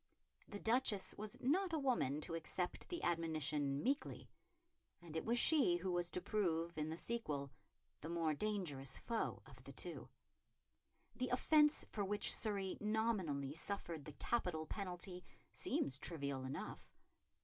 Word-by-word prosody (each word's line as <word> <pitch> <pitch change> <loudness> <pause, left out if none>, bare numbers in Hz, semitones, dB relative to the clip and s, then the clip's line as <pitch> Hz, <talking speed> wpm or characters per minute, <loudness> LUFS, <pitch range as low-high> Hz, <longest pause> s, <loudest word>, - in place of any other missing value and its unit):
The 205 - -6
Duchess 225 -3 +3
was 210 0 -5
not 345 +7 +2
a - - +3
woman 240 - +1
to 165 - -4
accept 170 +2 -3
the 345 - -3
admonition 155 -4 0
meekly, 275 +3 -1 0.7
and 170 -2 -10
it 160 - 0
was 235 +2 +2
she 270 - +5
who 180 +1 -2
was 175 -1 +1
to - - -1
prove, 170 -5 0
in 155 0 -1
the 160 - -3
sequel, 150 - -2 0.5
the 160 - -6
more 165 -2 +1
dangerous 150 -8 -1
foe 230 -1 -2
of - - -14
the - - -8
two. - - -5 1.1
The 255 0 0
offence 300 +4 +5
for 205 - -1
which 205 +2 +3
Surrey 200 -4 -1
nominally 205 -11 0
suffered 170 -2 -3
the 150 - -7
capital 170 -3 0
penalty 180 0 -3 0.3
seems 135 -1 +2
trivial 140 -6 -1
enough. 130 - -6
180 Hz, 145 wpm, -40 LUFS, 155-220 Hz, 1.1 s, she